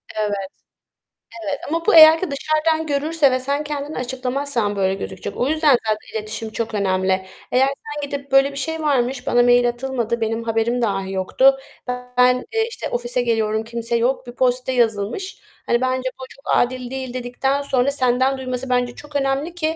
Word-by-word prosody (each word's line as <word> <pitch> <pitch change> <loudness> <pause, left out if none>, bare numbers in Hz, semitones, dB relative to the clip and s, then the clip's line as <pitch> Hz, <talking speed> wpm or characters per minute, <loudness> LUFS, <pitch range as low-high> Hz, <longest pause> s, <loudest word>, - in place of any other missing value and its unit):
Evet. 210 -1 -1 1.1
Evet 290 -2 -3
ama 330 +2 -2
bu 435 - +4
eğer 315 0 +10
ki 375 - -2
dışarıdan 310 +3 0
görürse 290 0 +2
ve 255 - +1
sen 280 +3 -1
kendini 295 0 -5
açıklamazsan 250 -3 -2
böyle 190 -1 +1
gözükecek. 190 0 -6
O 250 - +1
yüzden 310 -1 +2 0.2
zaten 215 - +2 0.2
iletişim 215 +1 -5
çok 230 0 -4
önemli. 190 -1 0 0.3
Eğer 265 +2 +4
sen 295 +1 -6
gidip 280 -1 -5
böyle 270 +1 +5
bir - - -11
şey 320 +3 -3
varmış, 265 -3 0
bana 245 -2 +4
mail 245 0 +5
atılmadı, 240 -2 -3
benim 225 +1 -1
haberim 230 +2 0
dahi 195 -3 -1
yoktu, 260 +8 +3 0.3
ben, 250 0 +1
eee, 450 0 +1
işte, 465 - -6
ofise 240 +1 -1
geliyorum, 220 -2 0
kimse 235 +1 -3
yok. 245 +2 0
Bir 240 - -6
post-it'e 255 0 +1
yazılmış. 235 - -1 0.3
Hani 240 +1 +1
bence 255 0 0
bu 260 - -7
çok 275 - -17
adil 250 0 0
değil 260 -2 -5
dedikten 255 +3 -1
sonra 270 -1 +1
senden 260 0 +2
duyması 255 0 -4
bence 245 -1 0
çok 295 0 -13
önemli 275 +4 -1
ki 320 -2 -1
255 Hz, 175 wpm, -21 LUFS, 235-280 Hz, 1.1 s, eğer